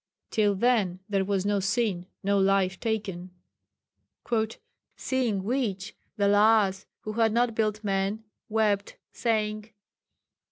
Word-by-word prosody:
Till 205 -2 +2
then, 200 -5 +2
there 195 -2 +1
was 195 -1 -1
no 205 0 +2
sin, 195 -3 0 0.2
no 200 +1 +2
life 195 -1 +2
taken.'). 200 -5 -3 1.7
"Seeing 240 -7 -1
which 205 -5 -2 0.2
the 200 - +2
Lhas 205 -1 +4
who 215 - -5
had 225 0 +2
not 235 +1 +2
built 215 -1 -1
men, 200 +2 -1 0.3
wept, 210 -2 0
saying. 215 -2 -1
205 Hz, 115 wpm, -27 LUFS, 195-220 Hz, 1.7 s, Lhas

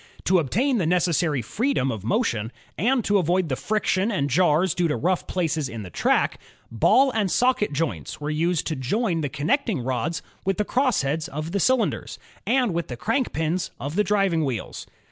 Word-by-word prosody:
To 185 0 +3
obtain 235 - +1
the 170 - 0
necessary 170 -6 +1
freedom 215 - 0
of 110 -4 -6
motion, 110 0 0 0.2
and 240 - +1
to 205 0 +3
avoid 175 0 +1
the 130 - 0
friction 215 - 0
and 140 -9 -1
jars 175 +3 +3
due 175 -2 +1
to 150 - 0
rough 180 +2 0
places 160 -5 -1
in 115 -3 -6
the 90 - -10
track, - - +1 0.3
ball 260 - +4
and 215 -5 0
socket 245 -2 +2
joints 155 +2 -3
were 150 +1 -3
used 165 +2 0
to 160 - -2
join 170 - -1
the 145 - -2
connecting 205 - 0
rods 130 +6 -2 0.2
with 195 0 0
the 210 - 0
crossheads 165 - 0
of 155 0 -5
the 200 - 0
cylin 255 +4 +3
ders, - - -8 0.3
and 245 -4 +2
with 170 0 -2
the 125 - -6
crank 235 - 0
pins 165 +3 -1
of 145 +3 -5
the 210 - +3
driving 195 -6 +1
wheels. 130 -6 -4
170 Hz, 190 wpm, -24 LUFS, 145-210 Hz, 0.3 s, ball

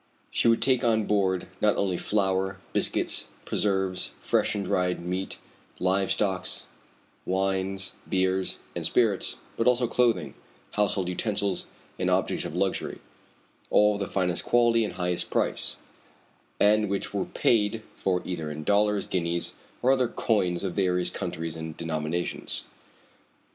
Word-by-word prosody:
She - - +2
would 115 0 +4
take 130 -1 +3
on 110 -3 +2
board 95 -3 +1 0.2
not 105 -1 +3
only 95 -2 +1
flour, 95 0 0 0.2
biscuits, - - +4 0.2
preserves, 95 -2 0
fresh - - +1
and 100 -1 -2
dried 90 0 0
meat, 90 +2 -3 0.4
live 95 +1 +1
stock, 95 -3 +1 0.8
wines, 95 0 -1 0.2
beers, 95 0 +1 0.2
and - - -3
spirits, 110 -6 +1 0.2
but 115 - +1
also 125 0 +4
clothing, 120 -1 +1 0.4
household 100 -3 +1
utensils, 100 +1 -1 0.3
and - - +1
objects - - +1
of - - -5
luxury - - -1 0.7
all 105 0 +5
of 100 - -4
the 100 - -2
finest 90 -3 0
quality 120 -1 +3
and 105 - -3
highest 90 -1 -1
price, - - 0 0.8
and 105 0 +4
which 100 0 -2
were 100 -2 -1
paid 110 -1 +1
for 90 -2 0
either 80 -4 -3
in 75 +1 -6
dollars, 105 +2 +2
guineas, 85 -1 -1 0.3
or 130 - +5
other 130 -2 +3
coins 95 -7 0
of 95 -3 -2
various 90 -2 +1
countries 85 -3 -4
and 80 -1 -6
denominations. 80 +1 -2
95 Hz, 140 wpm, -27 LUFS, 90-105 Hz, 0.8 s, all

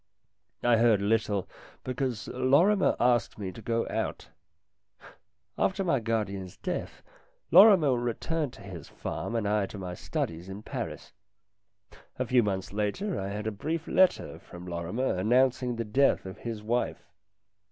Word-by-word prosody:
I 120 -1 +5
heard 115 -2 +4
little, 105 -1 0 0.4
because 125 -3 -3
Lorrimer 140 +11 +3
asked 120 -1 +2
me 95 -3 -4
to 115 - -11
go 115 +1 -1
out. - - -3 1.3
After 195 +1 +1
my 165 -8 +2
guardian's 100 -5 -3
death - - -5 0.5
Lorrimer 185 -7 +8
returned 125 +5 -2
to - - -13
his 90 -6 -9
farm 115 - -5
and 110 -3 0
I 105 -1 +1
to 105 - -9
my 90 -2 -5
studies 85 0 -4
in 100 +2 -8
Paris. - - -6 1.0
A 130 - -1
few 125 +1 +4
months 95 -3 -2
later 105 - -1
I 95 - -3
had 105 +2 -4
a 110 - -1
brief 160 - -3
letter 185 0 +2
from 90 0 -11
Lorrimer 90 +9 -2
announcing 125 +3 +2
the 115 0 -3
death 130 +3 +2
of 95 +2 -8
his 115 -3 -5
wife. 120 +3 -1
115 Hz, 145 wpm, -28 LUFS, 100-130 Hz, 1.3 s, Lorrimer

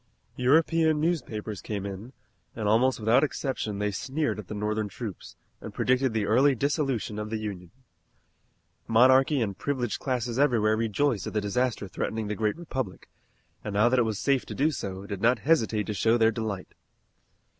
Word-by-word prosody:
European 160 +4 +3
newspapers 120 - -2
came 100 -2 -4
in, 100 +5 -7 0.4
and 110 -2 -2
almost 120 +4 +3
without 110 +5 +3
exception 130 -8 -2
they 105 0 -1
sneered 140 +4 -2
at 100 - -8
the 105 - -6
Northern 105 0 -2
troops, 105 -3 -8 0.3
and - - -9
predicted 130 0 +2
the 110 -2 -1
early 130 +6 +4
dissolution 135 -5 -1
of 105 0 -4
the 110 - -2
Union. 100 -5 -6 1.2
Monarchy 130 +4 +5
and 100 -4 -1
privileged 130 -5 -2
classes 125 -2 -2
everywhere 115 -6 +3
rejoiced 115 +1 0
at - - -5
the 105 - +1
disaster 110 +1 -1
threatening 110 +3 -3
the - - -1
great 105 +5 -1
republic, 130 - -5 0.5
and 100 - -5
now 110 +4 +4
that 130 +1 +3
it - - +4
was 110 -3 -2
safe 135 +2 +1
to - - -6
do 150 +4 +2
so, 95 -7 -5
did 100 -1 -6
not 120 +2 +4
hesitate 110 -9 +2
to 105 - -3
show 110 +4 +2
their 115 -1 +4
delight. 110 -4 -4
115 Hz, 175 wpm, -27 LUFS, 105-130 Hz, 1.2 s, Monarchy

